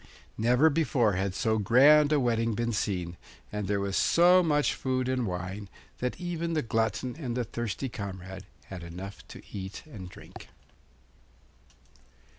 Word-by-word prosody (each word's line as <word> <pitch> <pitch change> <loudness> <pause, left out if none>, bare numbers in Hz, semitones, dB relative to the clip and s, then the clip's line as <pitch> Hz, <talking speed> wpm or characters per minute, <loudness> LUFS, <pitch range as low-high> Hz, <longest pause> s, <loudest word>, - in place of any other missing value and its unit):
Never 125 +8 +4
before 135 -8 +2
had 95 +1 -1
so 110 -1 +1
grand 145 +8 +6
a 150 - +4
wedding 115 -3 +1
been 120 +1 -1
seen, 90 -5 -2 0.3
and 105 -2 -3
there 100 0 0
was 100 -1 -2
so 180 +2 +5
much 150 -4 +2
food 130 -1 -1
and 130 -3 0
wine 95 +3 -5 0.3
that 125 0 -3
even 170 -2 -3
the 155 - 0
glutton 115 +2 -1
and 130 -6 -4
the 125 - +1
thirsty 120 +2 -4
comrade 95 -5 -7 0.2
had 95 -2 -8
enough 90 +4 -8
to - - -11
eat 95 -1 -6
and 105 -12 -9
drink. - - -13
115 Hz, 150 wpm, -28 LUFS, 100-135 Hz, 0.3 s, grand